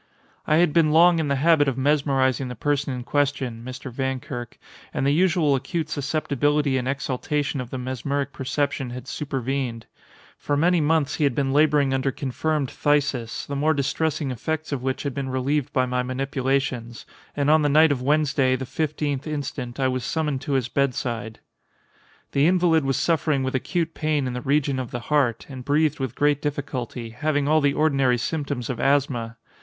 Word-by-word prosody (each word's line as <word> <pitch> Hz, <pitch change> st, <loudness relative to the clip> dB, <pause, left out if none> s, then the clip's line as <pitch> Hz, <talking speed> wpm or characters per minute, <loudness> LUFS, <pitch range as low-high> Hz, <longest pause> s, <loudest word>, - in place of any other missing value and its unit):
I 155 Hz, -, +4 dB
had 165 Hz, -2 st, +3 dB
been 165 Hz, -2 st, +4 dB
long 170 Hz, +2 st, +6 dB
in 155 Hz, -, 0 dB
the 140 Hz, -, +1 dB
habit 150 Hz, +1 st, +4 dB
of 135 Hz, -2 st, -1 dB
mesmerizing 135 Hz, -2 st, +1 dB
the 125 Hz, -, -6 dB
person 145 Hz, +3 st, -1 dB
in 125 Hz, -1 st, -4 dB
question 135 Hz, -5 st, -1 dB
(Mr. 130 Hz, +1 st, -7 dB
Vankirk), 130 Hz, -1 st, -4 dB, 0.3 s
and -, -, -1 dB
the 140 Hz, -, +3 dB
usual 165 Hz, -2 st, +3 dB
acute 150 Hz, +4 st, -2 dB
susceptibility 145 Hz, -1 st, 0 dB
and 125 Hz, -, -4 dB
exaltation 140 Hz, +1 st, -2 dB
of 125 Hz, -, -7 dB
the 130 Hz, -, -5 dB
mesmeric 135 Hz, +2 st, -3 dB
perception 135 Hz, 0 st, -2 dB
had 125 Hz, +1 st, -8 dB
supervened. 135 Hz, -4 st, -3 dB, 0.5 s
For 145 Hz, -, -1 dB
many 175 Hz, +2 st, +3 dB
months 150 Hz, -2 st, +1 dB
he 155 Hz, -, 0 dB
had 140 Hz, -4 st, +2 dB
been 135 Hz, -2 st, 0 dB
laboring 145 Hz, -2 st, +3 dB
under 135 Hz, +1 st, +1 dB
confirmed 140 Hz, +2 st, -2 dB
phthisis, 140 Hz, -5 st, 0 dB
the 140 Hz, -, -5 dB
more 155 Hz, +2 st, +2 dB
distressing 145 Hz, +1 st, -1 dB
effects 155 Hz, +6 st, -3 dB
of 140 Hz, -3 st, -2 dB
which 130 Hz, 0 st, -2 dB
had 140 Hz, -2 st, -2 dB
been 135 Hz, -1 st, -3 dB
relieved 130 Hz, +2 st, -1 dB
by 130 Hz, -1 st, +2 dB
my 125 Hz, 0 st, -1 dB
manipulations; 130 Hz, -2 st, -2 dB, 0.3 s
and 145 Hz, +1 st, +3 dB
on 155 Hz, 0 st, +5 dB
the 145 Hz, -, +2 dB
night 155 Hz, +2 st, +5 dB
of 135 Hz, -3 st, -1 dB
Wednesday, 140 Hz, -2 st, +2 dB
the 130 Hz, +1 st, -4 dB
fifteenth 150 Hz, -1 st, -2 dB
instant, 135 Hz, -4 st, -4 dB
I 130 Hz, -, +2 dB
was 130 Hz, -1 st, -2 dB
summoned 150 Hz, -1 st, -1 dB
to 145 Hz, -, -3 dB
his 130 Hz, -3 st, +1 dB
bedside. 120 Hz, -4 st, -2 dB, 0.9 s
The 140 Hz, +2 st, +3 dB
invalid 170 Hz, -4 st, +3 dB
was 135 Hz, -1 st, +1 dB
suffering 155 Hz, -4 st, +1 dB
with 130 Hz, -, -2 dB
acute 165 Hz, +5 st, -1 dB
pain 155 Hz, -3 st, 0 dB
in 125 Hz, -, -3 dB
the 125 Hz, -, -4 dB
region 140 Hz, -1 st, +1 dB
of 125 Hz, -3 st, -4 dB
the 120 Hz, -, -4 dB
heart, 130 Hz, -6 st, +2 dB
and 130 Hz, -3 st, -8 dB
breathed 150 Hz, +2 st, +1 dB
with 130 Hz, -2 st, -3 dB
great 145 Hz, 0 st, +2 dB
difficulty, 130 Hz, -5 st, -4 dB
having 145 Hz, +3 st, 0 dB
all 155 Hz, +1 st, +4 dB
the 140 Hz, -1 st, +2 dB
ordinary 135 Hz, -5 st, +2 dB
symptoms 140 Hz, -2 st, -3 dB
of 125 Hz, -4 st, -4 dB
asthma. 130 Hz, -5 st, +1 dB
140 Hz, 180 wpm, -24 LUFS, 130-150 Hz, 0.9 s, long